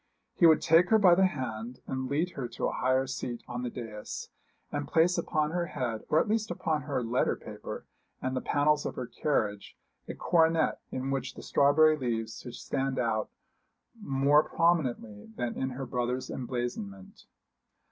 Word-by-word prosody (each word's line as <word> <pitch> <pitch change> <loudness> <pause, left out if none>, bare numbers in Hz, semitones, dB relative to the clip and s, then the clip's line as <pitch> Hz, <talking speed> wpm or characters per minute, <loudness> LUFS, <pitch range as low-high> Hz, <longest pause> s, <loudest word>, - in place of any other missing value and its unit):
He 170 - +5
would 160 - +5
take 165 +2 +5
her 220 - +6
by 190 -5 +6
the 190 +2 +5
hand 125 -6 -5
and 130 -1 -3
lead 160 +6 0
her 135 -7 -4
to - - -4
a - - +1
higher 130 +1 +1
seat 125 -2 -5
on 120 0 -4
the 125 - -2
dais, 105 -3 -7 0.4
and - - -3
place 170 +2 +3
upon 155 -3 0
her 175 0 -1
head, 125 -9 -3
or 155 - +4
at - - +1
least 215 0 0
upon 160 -3 -1
her 140 -3 -2
letter 120 +2 +1
paper - - -8 0.3
and 130 0 -2
the 130 - -1
panels 150 +1 +2
of - - -4
her - - -4
carriage, 110 -7 -2 0.3
a - - -5
coronet 165 -1 +2
in 130 +1 -3
which 135 -2 -3
the - - -9
strawberry 155 +2 +5
leaves 115 -5 -3
should 125 -1 -8
stand 135 0 -2
out 110 -3 0 0.7
more 140 -3 +4
prominently 130 -13 0
than 120 -1 -2
in 130 - -1
her 130 +1 -5
brother's 125 +1 -2
emblazonment. 120 -7 -5
135 Hz, 175 wpm, -29 LUFS, 120-155 Hz, 0.7 s, her